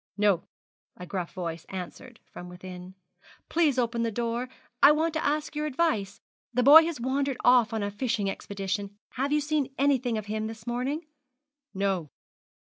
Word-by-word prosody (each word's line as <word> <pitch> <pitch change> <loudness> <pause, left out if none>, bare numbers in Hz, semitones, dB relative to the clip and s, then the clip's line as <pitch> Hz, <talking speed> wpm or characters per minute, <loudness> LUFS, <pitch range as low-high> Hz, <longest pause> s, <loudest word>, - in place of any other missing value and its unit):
'No,' 200 -4 +2 0.5
a 180 - -8
gruff 180 -2 -4
voice 170 -2 -5
answered 195 +6 -8
from 180 - -10
within. 180 +1 -10 0.5
'Please 315 -6 +2
open 235 -1 0
the 230 - +1
door, 235 +2 -2 0.3
'I 285 +2 +9
want 320 +1 0
to 315 - -1
ask 300 +1 -1
your 300 0 -1
advice. 255 -10 0 0.3
The 250 +1 +1
boy 310 +5 +9
has 330 -5 -3
wandered 265 +2 -1
off 245 -3 +5
on 220 -2 -2
a 205 - -2
fishing 220 -1 -1
expedition. 200 +1 -4
Have 275 +3 -2
you 300 0 +3
seen 295 -2 -1
anything 260 -4 +2
of 215 - -4
him 215 +1 -3
this 220 0 -9
morning?' 255 +7 -2 0.7
'No.' 190 -5 -1
235 Hz, 165 wpm, -27 LUFS, 200-280 Hz, 0.7 s, I